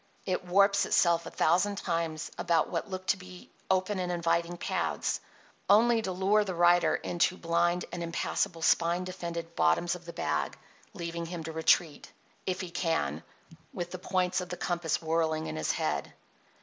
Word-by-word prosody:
It 185 Hz, -1 st, -1 dB
warps 200 Hz, +2 st, +4 dB
itself 170 Hz, -1 st, +3 dB
a -, -, -4 dB
thousand 185 Hz, +5 st, +2 dB
times 165 Hz, -4 st, -2 dB
about 170 Hz, -2 st, +1 dB
what 170 Hz, +4 st, -2 dB
look 185 Hz, -1 st, -5 dB
to 200 Hz, -, +2 dB
be 185 Hz, -1 st, -12 dB, 0.2 s
open 190 Hz, +1 st, +1 dB
and 180 Hz, -1 st, -1 dB
inviting 170 Hz, 0 st, 0 dB
paths, -, -, -1 dB, 0.5 s
only 225 Hz, +3 st, +5 dB
to 190 Hz, -, -3 dB
lure 195 Hz, +3 st, +3 dB
the 190 Hz, -3 st, -4 dB
rider 175 Hz, +1 st, +4 dB
into 175 Hz, +1 st, 0 dB
blind 175 Hz, +1 st, +1 dB
and 175 Hz, -, -5 dB
impassable 170 Hz, +1 st, -2 dB
spine 170 Hz, +2 st, +3 dB
defended 170 Hz, -2 st, -6 dB
"bottoms 80 Hz, -, +2 dB
of 175 Hz, -1 st, -8 dB
the 170 Hz, -, -8 dB
bag," -, -, -2 dB, 0.4 s
leaving 170 Hz, -2 st, -4 dB
him 170 Hz, -1 st, -5 dB
to 160 Hz, -, -5 dB
retreat, 160 Hz, 0 st, +1 dB, 0.4 s
if 185 Hz, 0 st, -1 dB
he 180 Hz, -2 st, -6 dB
can, 165 Hz, -1 st, -1 dB, 0.5 s
with 175 Hz, -1 st, -4 dB
the 185 Hz, -, -6 dB
points 185 Hz, 0 st, 0 dB
of 180 Hz, -, -7 dB
the 180 Hz, -, -5 dB
compass 170 Hz, -2 st, -1 dB
whirling 160 Hz, -1 st, 0 dB
in -, -, -4 dB
his 80 Hz, -, 0 dB
head. -, -, -2 dB
175 Hz, 170 wpm, -30 LUFS, 170-185 Hz, 0.5 s, only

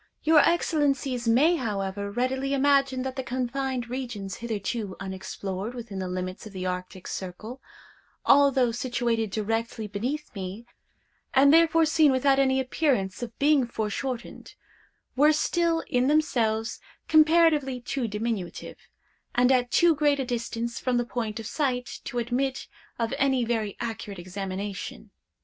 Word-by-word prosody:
Your 315 Hz, 0 st, +6 dB
Excellencies 280 Hz, -7 st, +1 dB
may, 295 Hz, +10 st, +4 dB
however, 200 Hz, -4 st, -3 dB
readily 260 Hz, +5 st, -1 dB
imagine 275 Hz, -2 st, +2 dB
that 260 Hz, -1 st, -4 dB
the 265 Hz, -, -2 dB
confined 255 Hz, 0 st, -2 dB
regions 235 Hz, -7 st, -5 dB
hitherto 220 Hz, -2 st, -3 dB
unexplored 190 Hz, +3 st, -5 dB
within 225 Hz, -5 st, -6 dB
the 185 Hz, -, -3 dB
limits 185 Hz, +2 st, -5 dB
of 210 Hz, -, -13 dB
the 185 Hz, -1 st, -5 dB
Arctic 180 Hz, 0 st, -5 dB
circle, 210 Hz, +8 st, -6 dB, 0.6 s
although 275 Hz, -3 st, +5 dB
situated 235 Hz, -2 st, -1 dB
directly 225 Hz, +2 st, -2 dB
beneath 250 Hz, +10 st, -4 dB
me, 195 Hz, +2 st, -6 dB, 0.7 s
and 280 Hz, +2 st, +6 dB
therefore 330 Hz, 0 st, +5 dB
seen 310 Hz, -2 st, +4 dB
without 270 Hz, +1 st, +3 dB
any 265 Hz, -1 st, +3 dB
appearance 255 Hz, -8 st, 0 dB
of 230 Hz, -2 st, -6 dB
being 285 Hz, -3 st, +3 dB
foreshortened, 235 Hz, +3 st, -4 dB, 0.6 s
were 295 Hz, +3 st, +5 dB
still, 330 Hz, +2 st, +1 dB
in 250 Hz, 0 st, +1 dB
themselves, 235 Hz, -7 st, +1 dB, 0.3 s
comparatively 310 Hz, -4 st, +4 dB
too 250 Hz, 0 st, -3 dB
diminutive, 210 Hz, -3 st, -4 dB, 0.6 s
and 250 Hz, +1 st, +4 dB
at 250 Hz, -1 st, +2 dB
too 340 Hz, +4 st, +5 dB
great 290 Hz, -1 st, +2 dB
a 265 Hz, -, -1 dB
distance 235 Hz, -1 st, -3 dB
from 250 Hz, -1 st, 0 dB
the 240 Hz, -, 0 dB
point 230 Hz, -2 st, -3 dB
of 225 Hz, -, -7 dB
sight, 250 Hz, -2 st, -2 dB
to 245 Hz, -, -5 dB
admit 250 Hz, +3 st, -1 dB, 0.3 s
of 230 Hz, +1 st, -1 dB
any 265 Hz, -3 st, +2 dB
very 220 Hz, -3 st, -2 dB
accurate 225 Hz, -3 st, -5 dB
examination. 190 Hz, +2 st, -6 dB
245 Hz, 135 wpm, -26 LUFS, 215-275 Hz, 0.7 s, Your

